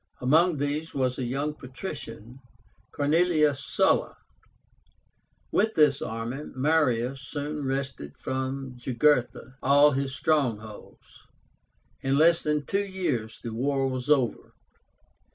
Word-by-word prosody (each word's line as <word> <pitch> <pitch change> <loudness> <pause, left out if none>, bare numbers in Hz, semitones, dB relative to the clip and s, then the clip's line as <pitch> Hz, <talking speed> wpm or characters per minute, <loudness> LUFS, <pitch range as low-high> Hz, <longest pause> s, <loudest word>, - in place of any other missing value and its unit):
Among 160 +6 +3
these 145 +3 -3
was 130 -2 0
a - - -1
young 140 +5 -2
patrician, 130 - -8 0.5
CORNELIUS 150 -1 +2
SULLA. - - +1 1.3
With 220 +2 +1
this 145 -3 +4
army 115 +5 -4
Marius 130 -3 +1
soon 145 +2 -5
wrested 135 - -4
from 130 0 -4
Jugurtha 130 +1 +1
all 145 +2 +5
his 135 0 -2
strongholds. 120 -8 -2 0.8
In 135 +1 +1
less 165 +2 +5
than 150 -1 -1
two 200 +7 0
years 175 - -3
the 115 -2 -5
war 135 +3 0
was 130 +1 -4
over. 135 -5 +1
135 Hz, 110 wpm, -27 LUFS, 125-150 Hz, 1.3 s, all